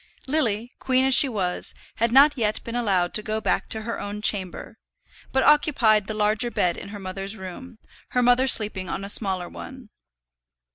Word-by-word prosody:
Lily, 245 -5 -2
queen 260 0 +1
as 265 - +4
she 275 +2 +8
was, 185 -6 -3 0.2
had 230 +1 0
not 280 +4 +6
yet 215 -4 -2
been 230 - -7
allowed 195 -7 0
to 215 - 0
go 215 0 -3
back - - -2
to 220 - -3
her 230 +1 -5
own 205 +1 -6
chamber, 200 +3 -2 0.5
but 265 - +1
occupied 235 -9 +3
the 220 - -5
larger 215 +3 0
bed 180 -6 0
in 195 - -8
her 205 - -8
mother's 195 +1 -6
room, 215 +6 -10 0.3
her 250 - 0
mother 245 +2 +3
sleeping 205 -7 +2
on 195 - -5
a 200 - -7
smaller 190 -4 +1
one. 260 -4 -11
220 Hz, 185 wpm, -23 LUFS, 200-250 Hz, 0.5 s, she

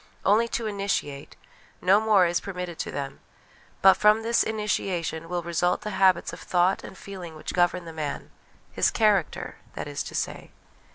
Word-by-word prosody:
Only 220 +4 +4
to 230 0 -3
initiate; 195 -9 -3 0.4
no 195 +3 +4
more 210 -4 +5
is 175 0 +1
permitted 180 -3 -6
to - - -3
them; 135 -1 -5 0.6
but 190 0 +9
from 210 +3 +4
this 230 +1 +2
initiation 185 -6 -2
will 175 -1 -2
result 170 +1 0
the 210 - -4
habits 190 -2 +3
of - - -8
thought 180 +1 +1
and 190 - -10
feeling 180 -5 -9
which 155 - -6
govern 175 0 +1
the 165 - -8
man 150 -3 -5 0.4
his - - +2
character, 210 -7 +1 0.2
that - - -5
is - - -4
to - - -8
say. - - -3
185 Hz, 170 wpm, -26 LUFS, 170-210 Hz, 0.6 s, but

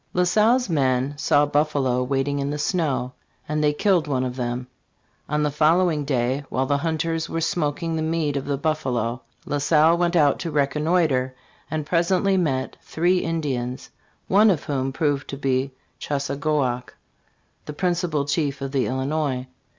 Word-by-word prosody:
La 180 - +3
Salle's 225 +7 +3
men 135 -3 +1
"saw 145 0 +3
buffalo 145 -4 +1
wading 135 +2 -1
in 140 0 -1
the 150 - -2
snow, 145 -6 -1 0.3
afld 150 0 -1
they 150 -1 +3
killed 175 +1 +2
one 130 -3 0
of 125 -1 -3
them."* 125 0 -3 0.6
On 150 0 +1
the 150 - +1
follow 165 +5 +3
ing 150 -2 -2
day, 130 0 0
while 130 - 0
the 140 +1 +1
hunters 165 +1 -1
were 165 - -2
smoking 165 0 -1
the 160 - -1
meat 160 -2 -1
of 140 - -2
the 140 -1 -1
buffalo, 130 -6 -1 0.2
La 145 - -1
Salle 155 +3 +4
went 175 0 0
out 145 -4 +4
to 170 - -3
reconnoiter, 145 -2 +1 0.3
.and 155 -2 -3
presently 180 +4 +2
met 135 -8 -1
three 175 +3 +1
Indians, 135 -7 -3 0.4
one 210 +3 +5
of 175 -7 +1
whom 135 -2 -2
proved 145 -1 -1
to 140 - -5
be 135 -1 0 0.3
Chassagoac, 140 -3 -1 0.7
the 150 - -5
principal 175 -3 0
chief 145 -1 -1
of 135 -1 -4
the 135 -2 +1
Illinois. 130 0 -1
145 Hz, 165 wpm, -23 LUFS, 135-165 Hz, 0.7 s, one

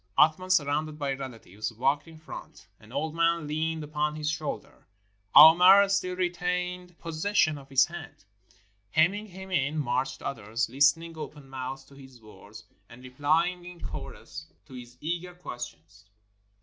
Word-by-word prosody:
Athman, 160 +4 +4
surrounded 155 -2 +1
by 140 -2 -1
relatives, 115 -6 -6
walked 135 +7 0
in 160 -1 -13
front. 160 - -11
An 110 +1 -17
old 150 +4 -2
man 165 -1 +1
leaned 155 +1 -2
upon 150 0 -2
his 155 0 -1
shoulder 155 -10 -6 0.2
— 100 0 -31
Aouimer 180 +6 +9
still 185 -2 0
retained 180 0 -2
pos 165 -2 -7
session 200 -6 +3
of 140 -1 -12
his 135 -1 +5
hand. 160 - -10 0.6
Hemming 190 - +2
him 190 0 -10
in, 150 -2 0
marched 130 -1 -1
others, 115 -1 -2
listening 150 +5 +2
open 145 -2 -8
mouthed 135 0 -6
to - - -18
his 130 -2 -14
words, 110 0 -14 0.3
and 125 +2 -14
replying 160 +7 0
in 175 0 -11
chorus - - -8 0.2
to 130 - -15
his 125 -1 -11
eager 175 +3 -4
questions. 105 - -9
150 Hz, 150 wpm, -28 LUFS, 130-170 Hz, 0.6 s, Aouimer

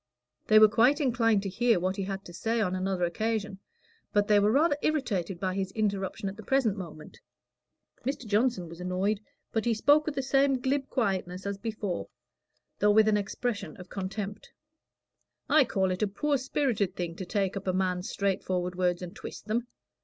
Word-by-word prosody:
They 215 - +6
were 215 0 +9
quite 245 +7 +4
inclined 230 -7 +2
to 195 - -2
hear 230 0 +2
what 185 +2 -1
he 200 - -3
had 195 0 -4
got - - -34
to 175 - -10
say 225 +6 -1
on 185 -4 +1
another 185 -1 -1
occasion, 210 +2 -1 0.5
but 205 0 +2
they 210 -1 +5
were 205 +1 +3
rather 290 +4 +4
irritated 205 - -1
by 185 0 -1
his 190 0 -2
interruption 200 -1 -1
at 195 - -5
the - - -8
present 250 -4 +2
moment. 160 -6 -9 0.8
Mr. 270 -1 -3
Johnson 210 -3 +1
was 170 +2 -10
annoyed, 185 +3 0 0.3
but 225 - 0
he 235 -1 +2
spoke 290 +8 +4
with 300 - -2
the 270 - -1
same 270 0 +3
glib 270 +2 -1
quietness 190 -5 -1
as 200 0 -3
before, 210 -4 -3 0.7
though 210 - +4
with 215 +1 +5
an 215 - +4
expression 210 +1 -3
of 180 -1 -11
contempt. 200 +2 -5 1.0
"I 310 -3 +5
call 190 -5 0
it 185 - -3
a 210 - +3
poor 280 +8 0
spirited 255 -7 0
thing 170 -2 -4
to 190 - -5
take 195 -1 0
up 195 0 -5
a - - +3
man's 185 0 -1
straight 200 -1 -1
forward 180 -1 -1
words 180 0 0
and 175 - -8
twist - - -9
them. 230 +3 -1
205 Hz, 195 wpm, -29 LUFS, 185-230 Hz, 1.0 s, were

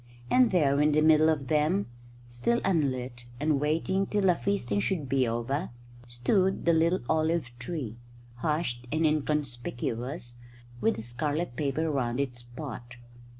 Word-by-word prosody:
And 250 -2 +5
there, 145 -6 +3
in 150 0 +3
the 155 - +4
middle 155 0 +6
of 145 -4 0
them, 155 +7 +2 0.4
still 120 - 0
unlit 130 -8 -1
and 150 -1 +2
waiting 165 +6 +1
till 205 -1 0
the 180 -2 +5
feasting 165 - -1
should 150 - -1
be 130 -1 +2
over, 120 +8 -2 0.4
stood 185 - +1
the 170 - +5
little 165 +3 +2
olive 160 -4 +1
tree, 125 -4 -4 0.4
hushed 125 -4 -2
and 160 +2 +1
inconspicuous, 125 -4 -2 0.4
with 225 - +2
the - - -6
scarlet 145 +5 -2
paper 155 +3 0
round 125 -3 -1
its 125 -3 -2
pot. 120 -1 -8
150 Hz, 145 wpm, -28 LUFS, 120-165 Hz, 0.4 s, middle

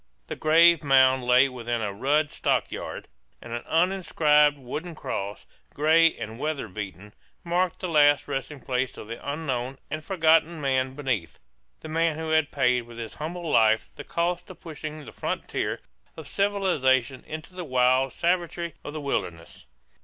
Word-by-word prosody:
The - - -5
grave 165 +1 +5
mound 130 -2 +4
lay 125 +2 +5
within 120 -2 -3
a 100 -1 -2
rude 145 +8 +1
stockade; - - -2 0.3
and 115 - -9
an 120 - -3
uninscribed 160 -4 +3
wooden 150 +6 -6
cross, 100 -7 -5 0.3
gray 160 +2 +4
and 110 +2 -7
weather 150 -5 -2
beaten, 100 0 -8 0.3
marked 175 +1 0
the 185 - -2
last 145 -3 +4
resting 140 0 -4
place 130 0 -2
of - - -9
the 115 +1 -7
unknown 135 -3 -3
and 155 +1 -4
forgotten 165 -2 +3
man 130 -2 0
beneath, 125 - -3 0.4
the - - -8
man 160 0 0
who 160 0 -4
had 160 -2 +3
paid 125 -3 +1
with 120 -1 -12
his 115 -2 -6
humble 170 +3 -5
life 110 -5 +3
the 145 - -8
cost 175 +2 -2
of - - -11
pushing 155 -2 -8
the - - -10
frontier - - -3 0.4
of - - -9
civilization 145 -11 +1
into 155 +3 -8
the 180 -1 -6
wild 130 -1 +2
savagery 170 -1 -1
of 145 - -7
the 155 - -5
wilderness. 85 - -4
145 Hz, 160 wpm, -26 LUFS, 125-165 Hz, 0.4 s, grave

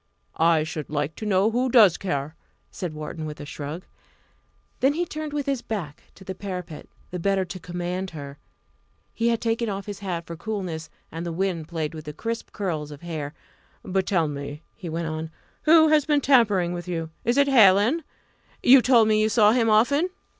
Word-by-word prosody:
"I 165 -1 +4
should 155 -2 -5
like 145 0 -2
to 215 - -5
know 200 +2 +3
who 250 +3 +1
does 215 -8 +6
care!" 150 -4 -3 0.4
said 170 -4 -5
Wharton, 155 +1 -6
with 150 0 -8
a - - -7
shrug. 150 +4 -6 1.0
Then 270 +2 +3
he 345 +3 -1
turned 310 -2 -5
with 290 -1 -2
his 275 -3 -1
back 170 -10 -5
to 190 - -14
the 190 0 -5
parapet, 180 -4 -7 0.2
the 180 - -4
better 195 +1 +1
to 185 +1 -8
command 180 +2 -4
her. 145 -3 -9 0.7
He 230 - 0
had 230 -1 +2
taken 230 0 -1
off 195 0 -4
his 205 -2 -6
hat 175 -4 -4
for 170 - -7
coolness, 175 -4 -5 0.2
and 165 +1 -5
the 170 - -3
wind 170 -2 -2
played 160 -2 -3
with 155 -1 -8
the 150 - -6
crisp 230 +8 -5
curls 160 -8 -3
of 145 -1 -10
hair. 155 -3 -5 0.5
"But 190 -1 -1
tell 170 -5 +2
me" 145 +1 -6
he 175 - -7
went 165 +1 -3
on 160 0 -4 0.4
"who 315 0 +7
has 305 -1 +4
been 295 -1 +3
tampering 210 -10 +3
with 175 0 -6
you? 165 -2 -3
Is 240 +3 +1
it 280 0 +5
Hallin? 230 - +5 0.6
You 260 +1 +8
told 235 -3 +5
me 215 0 +3
you 215 - +2
saw 215 -2 +5
him 230 -1 +2
often." 280 +11 +3
185 Hz, 195 wpm, -25 LUFS, 160-230 Hz, 1.0 s, You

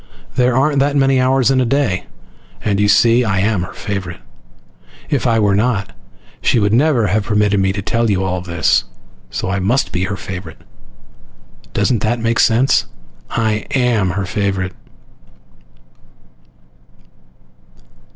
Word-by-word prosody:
There 125 0 +2
aren't 140 +1 +2
that 140 +1 +1
many 135 -2 +3
hours 130 0 +2
in 130 -1 +2
a - - +1
day! 115 -7 0 0.6
And, 100 -2 +1
you 105 - +3
see, 115 +4 +4
I 100 -4 0
am 105 -2 +1
her 90 - -6
favorite. 95 -4 -5 0.9
If 140 -3 +1
I 115 -1 +2
were 105 -2 +2
not, 105 -2 -1 0.5
she - - +2
would 105 -1 +1
never 130 -2 +3
have 105 +2 0
permitted 105 -1 +1
me 95 0 +2
to 100 0 -4
tell 115 +2 0
you 95 -2 +1
all 90 -1 -2
this, 85 -7 +1 0.4
so 60 +10 -3
I 95 - -1
must 115 +9 0
be 90 +1 -1
her 100 0 -4
favorite! 90 -3 -8 1.1
Doesn't 120 -4 +1
that 115 +3 0
make 115 0 0
sense? 120 +5 +3 0.4
I 110 -2 -1
AM 120 -7 +1
her 100 - -1
favorite! 95 -2 -2
105 Hz, 145 wpm, -17 LUFS, 95-125 Hz, 1.1 s, see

